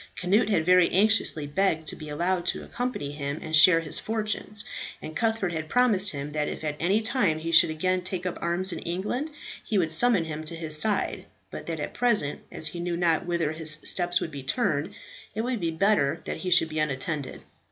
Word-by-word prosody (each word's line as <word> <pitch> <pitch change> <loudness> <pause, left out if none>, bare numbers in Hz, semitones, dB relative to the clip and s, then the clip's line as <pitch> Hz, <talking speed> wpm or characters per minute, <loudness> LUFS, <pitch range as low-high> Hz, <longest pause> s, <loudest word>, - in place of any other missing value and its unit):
Cnut 205 +5 +2
had 170 -7 +1
very 180 0 +5
anxiously 200 -6 +2
begged 160 0 0
to - - -5
be 155 -1 -9
allowed 175 +4 0
to - - -1
accompany 245 - -4
him 140 0 -4
and 160 0 -2
share 165 +2 +7
his 155 - -5
fortunes, 215 -1 -3 0.4
and 155 - -8
Cuthbert 220 -5 0
had 160 -1 -4
promised 220 -6 +3
him 145 -1 -5
that 150 0 -1
if - - -5
at 150 -1 -2
any 195 +6 +2
time 220 -9 +1
he 165 +1 -4
should 165 - +6
again 185 +4 0
take 185 0 -4
up 180 - -3
arms 175 +2 0
in - - -5
England, 205 - -3 0.3
he 215 - -1
would 165 -4 +1
summon 200 +1 +3
him 155 -1 -5
to 165 - -6
his 160 -2 +1
side, 210 +6 +1 0.3
but - - -8
that - - -3
at - - -4
present 225 -13 +1
as - - -1
he 175 - -7
knew 175 0 -2
not 170 -1 +1
whither 170 -3 0
his 155 -1 +1
steps 175 0 +1
would 160 - -4
be 140 -2 -7
turned, 155 - -1 0.4
it 220 - -1
would 245 0 -2
be 170 - -1
better 165 -3 +1
that - - -4
he 185 - -4
should 175 -2 +5
be 155 0 -3
unattended. 145 -1 -3
170 Hz, 215 wpm, -26 LUFS, 155-200 Hz, 0.4 s, share